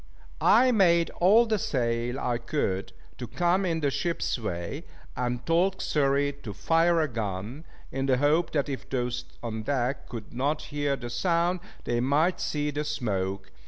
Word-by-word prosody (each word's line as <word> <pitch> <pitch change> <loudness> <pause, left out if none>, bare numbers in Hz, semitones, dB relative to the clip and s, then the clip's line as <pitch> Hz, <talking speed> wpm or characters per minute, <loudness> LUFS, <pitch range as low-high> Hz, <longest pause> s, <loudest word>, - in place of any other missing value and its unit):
I 255 0 +6
made 170 -6 +4
all 210 +7 +5
the 220 -2 0
sail 120 -2 -1
I 120 -1 -1
could 105 -7 -2 0.3
to 125 - -5
come 180 - +1
in 165 -2 -1
the 140 -2 +1
ship's 170 -4 -1
way, 85 -6 -4 0.3
and 125 0 -2
told 180 +3 +2
Xury 140 -1 +1
to 105 - -6
fire 165 - +3
a 155 - +1
gun, 110 - -5 0.3
in 135 +1 -2
the 130 -2 +3
hope 150 +5 +2
that 145 -2 +1
if 135 -4 -6
those 125 -1 -2 0.2
on 110 -2 -3
deck 130 +2 -2
could 115 -2 -8
not 140 +5 -1
hear 145 -1 0
the 120 -3 -7
sound, 170 +7 +1 0.2
they 120 0 0
might 145 +8 +2
see 150 -1 -1
the 145 +1 -2
smoke. 95 -9 -3
140 Hz, 165 wpm, -27 LUFS, 120-165 Hz, 0.3 s, I